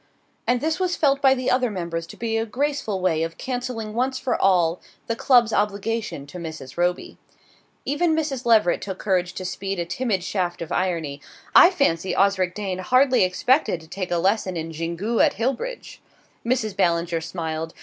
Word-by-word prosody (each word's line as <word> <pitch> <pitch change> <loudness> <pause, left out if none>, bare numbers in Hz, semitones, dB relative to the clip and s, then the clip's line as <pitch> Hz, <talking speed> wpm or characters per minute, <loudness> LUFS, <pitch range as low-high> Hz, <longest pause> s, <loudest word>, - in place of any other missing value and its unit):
And 245 +1 +2
this 315 +2 -1
was 365 -1 0
felt 280 -3 +2
by 270 -1 +5
the 255 -1 -1
other 250 -1 +2
members 170 -4 -4
to - - -12
be 225 -1 -2
a 225 - +1
graceful 245 -3 -2
way 165 -4 +1
of 165 0 -3
cancelling 245 -4 -4
once 255 +3 0
for 255 -2 -1
all 180 -3 +2 0.2
the 230 - -2
club's 240 -2 +4
obligation 210 -5 -1
to 160 +5 -9
Mrs. 160 -6 -8
Roby. 175 +1 -1 0.7
Even 315 +4 +1
Mrs. 290 -5 -2
Leveret 220 -7 +3
took 190 -2 -5
courage 180 -3 0
to 185 - -5
speed 195 +1 -4
a 170 - -2
timid 195 +1 -1
shaft 180 -3 -2
of 170 0 -6
irony. 160 -6 -1 0.3
"I 350 - +10
fancy 190 - 0
Osric 190 -2 +2
Dane 195 -3 -3
hardly 255 +5 +4
expected 200 - +2
to 160 - -15
take 185 +2 -5
a 175 - +1
lesson 190 0 0
in 165 0 -4
Xingu 170 +8 -2
at - - +3
Hillbridge!" 460 - -3 0.4
Mrs. 230 -4 -1
Ballinger 170 -3 +1
smiled. 160 -1 -4
200 Hz, 180 wpm, -23 LUFS, 175-250 Hz, 0.7 s, I